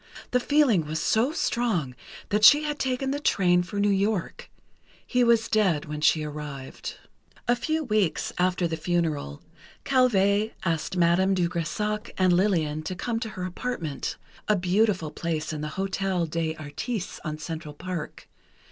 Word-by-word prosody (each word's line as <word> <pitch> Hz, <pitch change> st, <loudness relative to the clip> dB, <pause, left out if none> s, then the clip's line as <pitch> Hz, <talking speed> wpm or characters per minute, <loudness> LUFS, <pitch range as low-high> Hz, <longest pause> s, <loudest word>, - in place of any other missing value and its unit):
The 250 Hz, -, +3 dB
feeling 250 Hz, -, +3 dB
was 155 Hz, +1 st, -2 dB
so 225 Hz, -, +2 dB
strong 225 Hz, -, 0 dB, 0.4 s
that 210 Hz, +1 st, +1 dB
she 295 Hz, +6 st, +9 dB
had 295 Hz, -1 st, -3 dB
taken 265 Hz, 0 st, -1 dB
the 285 Hz, -, -1 dB
train 180 Hz, -10 st, +3 dB
for 200 Hz, +3 st, -4 dB
New 205 Hz, 0 st, +3 dB
York. 200 Hz, -1 st, -1 dB, 0.6 s
He 250 Hz, -1 st, +2 dB
was 235 Hz, -2 st, +4 dB
dead 190 Hz, -9 st, +2 dB
when 150 Hz, 0 st, -5 dB
she 155 Hz, 0 st, +3 dB
arrived. 150 Hz, -3 st, -7 dB, 0.5 s
A 240 Hz, -, +4 dB
few 315 Hz, +6 st, -1 dB
weeks 215 Hz, -, 0 dB
after 180 Hz, -1 st, +2 dB
the 165 Hz, -1 st, -3 dB
funeral, 155 Hz, -, -2 dB, 0.4 s
Calvé 215 Hz, -5 st, +3 dB
asked 170 Hz, +1 st, -1 dB
Madame 180 Hz, +3 st, +3 dB
de 175 Hz, -2 st, +2 dB
Grésac 210 Hz, +6 st, -2 dB
and 185 Hz, -1 st, +4 dB
Lillian 170 Hz, -5 st, +1 dB
to 170 Hz, +4 st, -5 dB
come 225 Hz, +5 st, -2 dB
to 225 Hz, -1 st, -4 dB
her 185 Hz, -3 st, -6 dB
apartment, 180 Hz, -, -4 dB, 0.3 s
a 210 Hz, -, +4 dB
beautiful 185 Hz, -3 st, +1 dB
place 160 Hz, -2 st, -3 dB
in 150 Hz, -, -4 dB
the 150 Hz, -, -3 dB
Hôtel 190 Hz, -2 st, -1 dB
des 160 Hz, 0 st, -2 dB
Artistes, 160 Hz, -, -5 dB
on 155 Hz, -2 st, -4 dB
Central 160 Hz, -1 st, -6 dB
Park. 180 Hz, -1 st, -6 dB
185 Hz, 155 wpm, -26 LUFS, 160-220 Hz, 0.6 s, she